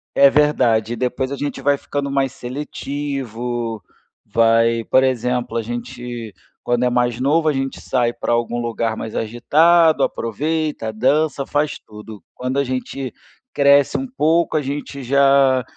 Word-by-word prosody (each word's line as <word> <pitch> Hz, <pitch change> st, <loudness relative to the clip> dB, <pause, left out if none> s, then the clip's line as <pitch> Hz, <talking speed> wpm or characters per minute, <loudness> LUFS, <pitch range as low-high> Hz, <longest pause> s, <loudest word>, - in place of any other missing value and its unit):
É 140 Hz, -, +7 dB
verdade. 120 Hz, -7 st, +2 dB
E -, -, -3 dB
depois 125 Hz, +2 st, -2 dB
a -, -, -2 dB
gente 145 Hz, +1 st, -4 dB
vai 145 Hz, 0 st, +2 dB
ficando 140 Hz, 0 st, -4 dB
mais 135 Hz, -1 st, 0 dB
seletivo, 125 Hz, -4 st, -5 dB, 0.4 s
vai 115 Hz, 0 st, +3 dB
por 130 Hz, -, +3 dB
exemplo, 125 Hz, -1 st, -1 dB
a -, -, 0 dB
gente 120 Hz, -1 st, -6 dB, 0.3 s
quando 120 Hz, 0 st, 0 dB
é 125 Hz, -, +3 dB
mais 120 Hz, -1 st, 0 dB
novo 155 Hz, +5 st, +2 dB
a 155 Hz, -, +3 dB
gente 135 Hz, 0 st, -3 dB
sai 120 Hz, -2 st, 0 dB
pra -, -, -3 dB
algum 120 Hz, 0 st, -1 dB
lugar 115 Hz, -1 st, -2 dB
mais 110 Hz, -, -6 dB
agitado, 155 Hz, +7 st, +3 dB
aproveita, 150 Hz, 0 st, -2 dB
dança, 140 Hz, +4 st, +1 dB
faz 145 Hz, +1 st, -1 dB
tudo. 105 Hz, -1 st, -12 dB
Quando 130 Hz, +2 st, -3 dB
a -, -, +2 dB
gente 130 Hz, 0 st, -4 dB, 0.4 s
cresce 140 Hz, -1 st, +4 dB
um 270 Hz, -, -3 dB
pouco, 170 Hz, -, +1 dB
a -, -, +1 dB
gente 140 Hz, 0 st, -5 dB
já 135 Hz, 0 st, +4 dB
130 Hz, 150 wpm, -20 LUFS, 120-145 Hz, 0.4 s, É